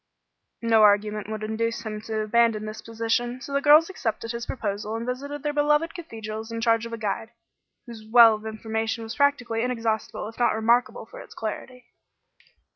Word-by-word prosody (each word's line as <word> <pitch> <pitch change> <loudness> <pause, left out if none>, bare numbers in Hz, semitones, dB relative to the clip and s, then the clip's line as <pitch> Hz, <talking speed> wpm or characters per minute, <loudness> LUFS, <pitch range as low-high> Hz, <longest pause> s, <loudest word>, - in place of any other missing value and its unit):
No 225 -1 +4
argument 210 0 +3
would 215 -1 -5
induce 230 +2 -2
him 215 -1 -5
to 220 -1 -1
abandon 215 0 +2
this 215 0 -7
position; 230 +2 -2
so 280 - -8
the 280 - +1
girls 305 +3 +7
accepted 230 - -3
his 235 0 -5
proposal 210 -2 -3
and 230 +1 -4
visited 280 +3 -5
their 295 -1 -1
beloved 295 +2 +2
cathedrals 220 - -7
in 230 - -4
charge 230 0 +2
of 230 - -10
a - - -3
guide, 225 +1 -3 0.6
whose 230 -2 -10
well 230 -1 +8
of 215 +1 -6
information 220 +1 -3
was 225 +1 -6
practically 245 -5 +1
inexhaustible 230 -4 -2
if 225 - -11
not 240 - +3
remarkable 235 +3 +1
for - - -12
its - - -12
clarity. 250 -1 -6
230 Hz, 180 wpm, -25 LUFS, 220-250 Hz, 0.6 s, well